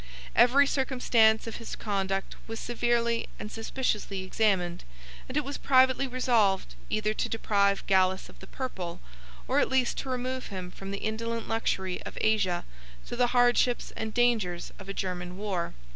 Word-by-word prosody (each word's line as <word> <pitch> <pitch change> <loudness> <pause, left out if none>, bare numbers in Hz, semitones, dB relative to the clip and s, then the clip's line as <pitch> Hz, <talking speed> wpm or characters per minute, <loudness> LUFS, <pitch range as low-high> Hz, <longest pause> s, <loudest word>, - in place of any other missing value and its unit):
Every 250 +4 +6
circumstance 250 -5 +3
of 225 - -5
his 230 - -6
conduct 195 -2 -2
was 225 0 -5
severely 235 -1 0
and 210 - -6
suspiciously 220 -4 -2
examined, 185 -3 +1 0.5
and 255 - -2
it 300 - +2
was 280 +1 -5
privately 260 0 +4
resolved, 230 - +2 0.2
either 215 0 0
to - - -2
deprive 200 -3 +1
Gallus 190 -1 +2
of - - -16
the 190 - -12
purple, 190 -11 -5 0.5
or - - +3
at - - +2
least 260 -2 +1
to 270 - -5
remove 255 0 -3
him 185 -3 -6
from 195 +1 -8
the 200 - -3
indolent 230 +1 -3
luxury 190 -5 -1
of - - -9
Asia 205 -5 +1 0.4
to - - -3
the 245 - +3
hardships 245 0 +2
and 220 0 -3
dangers 220 -7 +1
of 190 0 -10
a - - -2
German 180 -1 -4
war. 195 -4 -3
220 Hz, 160 wpm, -28 LUFS, 195-245 Hz, 0.5 s, Every